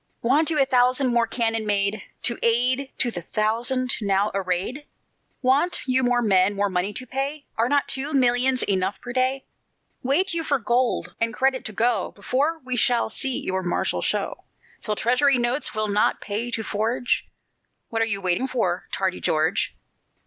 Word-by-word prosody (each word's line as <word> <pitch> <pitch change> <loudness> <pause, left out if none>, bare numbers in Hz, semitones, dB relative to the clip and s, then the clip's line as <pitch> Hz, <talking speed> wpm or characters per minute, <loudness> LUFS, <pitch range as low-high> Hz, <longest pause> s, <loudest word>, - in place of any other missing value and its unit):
Want 290 +7 +3
you 310 -2 +1
a 275 - +5
thousand 255 0 +2
more 235 -1 +3
cannon 225 -1 0
made, 200 +1 0 0.2
To 235 - -1
add 250 +4 +2
to 240 - +1
the 175 - -5
thousand 235 +7 0
now 200 0 +1
arrayed? 195 +8 -2 0.6
Want 275 +8 +3
you 255 0 +2
more 245 -1 +2
men, 195 -1 +3
more 200 0 +1
money 180 +2 0
to 255 +4 -6
pay? 275 +3 -4
Are 230 +2 +1
not 285 0 +2
two 275 +3 -3
millions 255 -1 +2
enough 190 0 -1
per 245 - -7
day? 260 +1 0 0.6
Wait 335 +9 +1
you 335 -1 -1
for 285 -2 +1
gold 240 +1 0
and 230 +1 0
credit 265 0 +1
to 215 - -4
go, 230 +4 0
Before 280 +10 0
we 255 -1 -1
shall 240 -2 +2
see 265 +2 -2
your 190 0 -1
martial 175 -1 -1
show; - - -2 0.4
Till 215 - -2
Treasury 255 +5 +3
Notes 240 +2 -1
will 215 0 0
not 205 +1 +2
pay 215 +4 -3
to 225 -2 -2
forge? 225 +4 -1 0.6
What 225 0 -1
are - - +4
you 200 -3 -2
waiting 185 +8 +1
for, 185 -9 -1
tardy 190 -1 -1
George? 155 +1 +1
240 Hz, 175 wpm, -24 LUFS, 210-260 Hz, 0.6 s, a